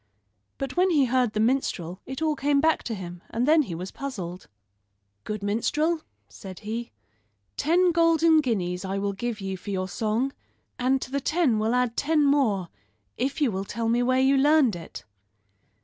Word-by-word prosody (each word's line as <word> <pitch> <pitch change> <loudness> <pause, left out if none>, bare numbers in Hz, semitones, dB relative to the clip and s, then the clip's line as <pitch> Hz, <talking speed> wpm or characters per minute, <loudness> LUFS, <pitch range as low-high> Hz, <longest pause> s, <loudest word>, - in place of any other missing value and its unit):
But 270 -1 -4
when 365 +1 +3
he 295 -6 +4
heard 250 -2 +1
the 215 - -1
minstrel 215 -7 0
it 265 +4 -4
all 310 -1 +1
came 285 0 +2
back 320 +2 +2
to 230 - -3
him; 175 -2 -8
and 240 +3 -1
then 315 +1 +6
he 195 - -4
was 180 +3 -6
puzzled. 190 -10 -6 0.8
"Good 210 -1 -4
minstrel," 300 +11 0 0.3
said 190 -3 -11
he, 230 +3 -4 0.7
"ten 350 +3 +3
golden 330 -1 +4
guineas 180 -8 -2
I 195 +1 -3
will 200 0 -1
give 230 +2 -4
you 195 -1 -4
for 190 - -10
your 185 -2 -2
song, 225 +7 -1 0.5
and 260 +2 +2
to 255 - -9
the 280 0 -1
ten 290 -7 +1
will 220 +3 +1
add 250 -2 +1
ten 300 0 +2
more 225 - +2 0.5
if 270 +4 -2
you 275 -6 +3
will 190 0 -3
tell 225 +3 -3
me 240 +1 +2
where 255 +1 +2
you 270 +1 +4
learned 285 - +4
it." 165 -2 -9
245 Hz, 180 wpm, -26 LUFS, 200-285 Hz, 0.8 s, then